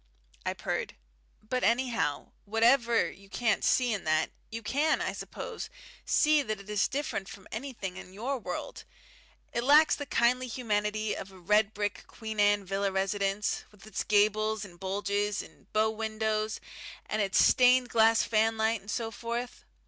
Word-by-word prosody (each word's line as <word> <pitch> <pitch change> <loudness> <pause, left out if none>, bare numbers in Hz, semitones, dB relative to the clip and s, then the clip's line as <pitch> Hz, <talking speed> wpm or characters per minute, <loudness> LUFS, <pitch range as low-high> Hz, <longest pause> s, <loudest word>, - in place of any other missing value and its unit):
I - - +1
purred. - - -3 0.5
"But, 255 +3 -1
anyhow, 230 - 0
whatever 230 +2 +3
you 195 0 -17
can't 225 +1 0
see 250 -3 +3
in 205 - -3
that, 155 0 +1 0.2
you 230 0 -6
can, 295 +8 +1
I - - -2
suppose, - - -6 0.4
see 305 -1 +4
that 215 -6 -3
it 200 - -13
is 210 -2 +2
different 260 -8 -3
from 195 - -11
anything 220 -6 -5
in 185 - -10
your 245 +7 -3
world - - -6 0.7
it 235 - -1
lacks 300 +4 +6
the 290 - -6
kindly 250 +2 +2
humanity 215 -3 -1
of 195 - -7
a 190 - -14
red 210 +4 +2
brick 205 -2 -3
Queen 220 -2 -7
Anne 205 -1 +4
villa 195 +1 -1
residence, 195 +1 0
with 210 -1 -18
its 215 -2 -3
gables 215 +1 +2
and 175 -3 -14
bulges, 200 +2 -1
and - - -18
bow 215 +1 +2
windows, 220 -1 -2 0.5
and 215 - -1
its 195 -1 +1
stained 250 0 +5
glass 225 0 +4
fanlight, 220 0 +1
and 200 - -14
so 225 +1 -2
forth. 235 +2 -5
215 Hz, 160 wpm, -29 LUFS, 205-235 Hz, 0.7 s, lacks